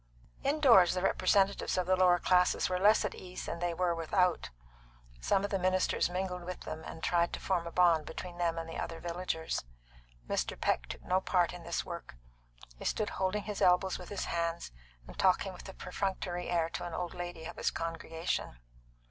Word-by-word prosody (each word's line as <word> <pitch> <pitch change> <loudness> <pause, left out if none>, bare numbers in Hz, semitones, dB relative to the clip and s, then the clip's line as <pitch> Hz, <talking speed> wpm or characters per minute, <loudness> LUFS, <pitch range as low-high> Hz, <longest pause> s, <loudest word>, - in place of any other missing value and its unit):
In 285 +3 +1
doors 195 - +7
the 180 - -1
representatives 195 +1 +2
of 185 - +1
the 185 +1 +3
lower 180 -1 +5
classes 180 0 +3
were 180 0 0
less 210 +3 +5
at 210 - -2
ease 180 0 -8
than 170 - -4
they 175 0 0
were 175 +1 +1
without. 170 - +1 0.7
Some 190 - +1
of 205 - -2
the 195 - +1
ministers 185 0 +2
mingled 180 0 -3
with 180 +1 -6
them, 155 0 -6
and 160 - -9
tried 170 -1 +2
to - - -3
form 175 -3 -1
a - - -6
bond 170 -4 +4
between 175 -1 -7
them 170 -1 +1
and 165 0 -4
the 165 - -6
other 165 -1 -4
villagers. 170 - -3 0.6
Mr. - - -2
Peck - - 0
took - - -8
no 185 +1 +1
part 180 -2 +2
in 180 - -8
this 170 0 -3
work; 170 - -7 0.6
he - - -8
stood 215 - 0
holding 190 +2 -1
his 210 -1 -5
elbows 180 +1 +3
with 180 - -9
his 205 - -3
hands, 170 - -2 0.3
and - - -13
talking 190 +1 +3
with 180 - -10
a - - -8
perfunctory 180 -1 -3
air 170 -2 +2
to - - -5
an 175 -2 -5
old 175 -1 -3
lady 175 -2 -6
of - - -7
his - - +1
congregation. 165 - -3
180 Hz, 200 wpm, -32 LUFS, 170-185 Hz, 0.7 s, doors